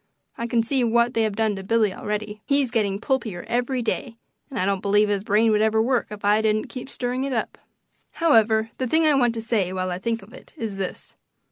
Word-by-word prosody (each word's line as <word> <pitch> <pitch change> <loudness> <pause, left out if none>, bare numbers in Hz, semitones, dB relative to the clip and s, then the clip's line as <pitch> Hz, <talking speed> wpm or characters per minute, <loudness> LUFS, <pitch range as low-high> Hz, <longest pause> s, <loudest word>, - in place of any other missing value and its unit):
I 235 - -4
can 235 -1 +1
see 260 +2 +1
what 235 +1 +2
they 225 - +1
have 215 -2 0
done 220 -1 +1
to 195 - -7
Billy 215 -1 +2
already; 210 +1 -4
he's 280 -3 +2
getting 205 -4 0
pulpier 230 -7 -2
every 245 +1 -1
day, 230 +1 -3 0.3
and 265 - -6
I 185 - +1
don't 195 -1 0
believe 205 +1 +3
his 200 -1 0
brain 220 +2 +3
would 210 0 +3
ever 220 0 +2
work 245 +2 +1
if 210 -1 -7
I 210 +1 +4
didn't 215 0 0
keep 255 +1 -7
stirring 250 0 -2
it 275 -1 -2
up. 225 - -3 0.5
However, 225 -8 +3
the 255 - 0
thing 320 +5 +3
I 305 - +5
want 245 -4 +2
to 225 - -3
say 215 -6 0
while 185 -1 -2
I 180 - -3
think 230 +1 -2
of 215 +5 -16
it - - -14
is 215 -4 -4
this. 190 -2 -5
225 Hz, 235 wpm, -24 LUFS, 210-245 Hz, 0.5 s, I